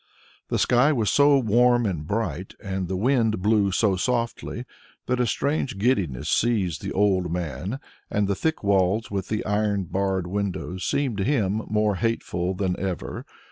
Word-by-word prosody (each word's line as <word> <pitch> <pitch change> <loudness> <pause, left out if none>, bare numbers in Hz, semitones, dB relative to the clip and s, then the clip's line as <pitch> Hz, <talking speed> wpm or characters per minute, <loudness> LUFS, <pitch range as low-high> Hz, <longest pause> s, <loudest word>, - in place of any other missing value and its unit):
The - - -1
sky 125 +5 +4
was 115 -8 +1
so 145 0 +5
warm 120 0 +3
and 85 -7 -3
bright, 100 -3 -3
and 95 -2 -3
the 95 +1 -2
wind 115 -1 +2
blew 105 -2 +3
so 100 +1 +2
softly 120 +2 -2 0.4
that 125 0 0
a 125 - +2
strange 140 -1 -1
giddiness 95 - 0
seized 95 -9 +1
the - - -4
old 95 -3 +1
man, 90 - -3 0.3
and 105 -1 0
the 100 - +1
thick 160 +7 -2
walls 100 +2 +2
with 95 -2 -3
the 110 - -2
iron 105 -1 0
barred 95 +1 -1
windows 95 -1 -3
seemed 135 -7 0
to - - +1
him 110 -5 +1
more 105 -2 +1
hateful 95 -5 -1
than 90 -1 -1
ever. 95 -2 -4
105 Hz, 165 wpm, -24 LUFS, 95-120 Hz, 0.4 s, so